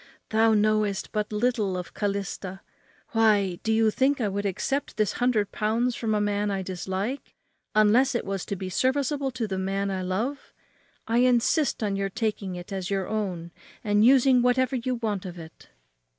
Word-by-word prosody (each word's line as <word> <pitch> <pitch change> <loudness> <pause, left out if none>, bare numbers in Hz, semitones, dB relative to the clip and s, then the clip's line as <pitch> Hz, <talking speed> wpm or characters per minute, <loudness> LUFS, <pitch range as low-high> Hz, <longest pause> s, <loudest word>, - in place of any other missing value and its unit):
thou 220 +1 +4
knowest 215 -2 +1
but 210 -1 -2
little 210 -3 0
of 180 - -7
Calista. 195 -2 -3 0.5
Why, 205 -5 +2
do 220 - -1
you 220 0 +3
think 270 +5 +1
I 215 -4 0
would 200 +1 -2
accept 270 +9 -2
this 215 -2 +2
hundred 225 -5 +2
pounds 230 +4 0
from 220 -2 -1
a - - +1
man 205 0 0
I 195 -1 -2
dislike, 190 +7 -4 0.4
unless 230 +5 +4
it - - -1
was 195 -1 -3
to 200 - -3
be 190 0 -5
serviceable 270 +6 0
to 245 -3 -3
the 190 -2 -3
man 195 +1 -1
I 190 -1 -2
love? 215 +10 -3 0.5
I 230 +1 +2
insist 250 +2 +2
on 200 -2 0
your 195 0 -1
taking 210 -3 -3
it 175 +2 -8
as 190 -2 -3
your 195 -2 -1
own 185 -6 -3 0.3
and 205 0 +3
using 260 0 +5
whatever 255 +2 +2
you 255 +1 -1
want 215 -5 -2
of 180 -2 -7
it." 160 -1 -12
210 Hz, 180 wpm, -26 LUFS, 195-240 Hz, 0.5 s, using